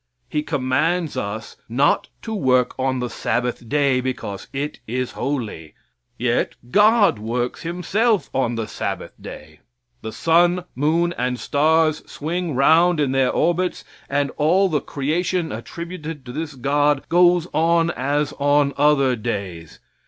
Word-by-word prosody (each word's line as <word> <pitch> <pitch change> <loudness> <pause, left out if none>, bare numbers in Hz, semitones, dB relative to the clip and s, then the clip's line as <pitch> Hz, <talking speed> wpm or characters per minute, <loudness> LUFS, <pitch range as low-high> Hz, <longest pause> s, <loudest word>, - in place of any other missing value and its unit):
He 150 +4 -1
commands 150 +4 0
us 105 +3 -5
not 135 +5 +2
to 225 - -4
work 130 - +2
on 130 -1 0
the 125 - -1
Sabbath 120 0 -2
day, 140 -3 +2
because 125 -6 -5
it 145 +2 -4
is 125 +2 -2
holy. 115 - -4 0.4
Yet - - 0 0.2
God 205 - +5
works 120 +3 -3
himself 180 - 0
on 120 -3 0
the 115 -1 -2
Sabbath - - -4
day. 75 0 -10 0.4
The 110 - -5
sun, 175 +5 +2
moon 165 +5 +1
and 125 0 -1
stars 155 +1 +2
swing 165 0 -3
round 160 +5 +4
in 140 -3 +1
their 135 -1 +2
orbits, 175 +2 0 0.3
and 140 0 0
all 180 +6 +3
the 150 -4 0
creation 165 +5 -1
attributed 165 -4 -7
to 120 - -7
this 150 +2 -5
God 145 +2 +1
goes 175 -1 +4
on 165 +1 +2
as 145 +2 -1
on 145 0 +3
other 140 -3 +3
days. 100 -8 -5
145 Hz, 140 wpm, -21 LUFS, 125-170 Hz, 0.4 s, God